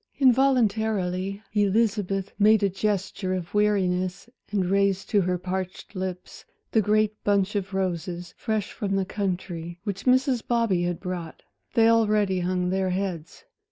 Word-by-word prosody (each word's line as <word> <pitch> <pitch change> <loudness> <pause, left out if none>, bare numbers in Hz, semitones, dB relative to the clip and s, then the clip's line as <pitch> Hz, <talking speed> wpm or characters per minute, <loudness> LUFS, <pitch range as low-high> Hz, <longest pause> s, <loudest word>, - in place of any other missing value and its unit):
Involuntarily 220 -7 +2
Elizabeth 200 -2 +1
made 215 0 +5
a 200 - +3
gesture 190 -1 -1
of 175 -2 -6
weariness, 185 -3 +1 0.2
and 200 -2 0
raised 195 0 +1
to 205 - +4
her 180 0 0
parched 185 +2 -5
lips 185 -1 -5 0.3
the 220 - +4
great 215 +1 +1
bunch 200 0 +1
of 200 -1 -2
roses, 175 -2 -3
fresh 215 -3 -2
from 195 -2 -2
the 195 -1 +1
country, 175 -4 -4
which 200 -3 -4
Mrs. 255 -1 +3
Bobby 230 -7 +2
had 175 -1 -1
brought. 180 -3 -6 0.3
They 225 -1 +5
already 210 -4 +3
hung 180 0 0
their 190 0 0
heads. 180 - -4
195 Hz, 140 wpm, -25 LUFS, 185-215 Hz, 0.3 s, made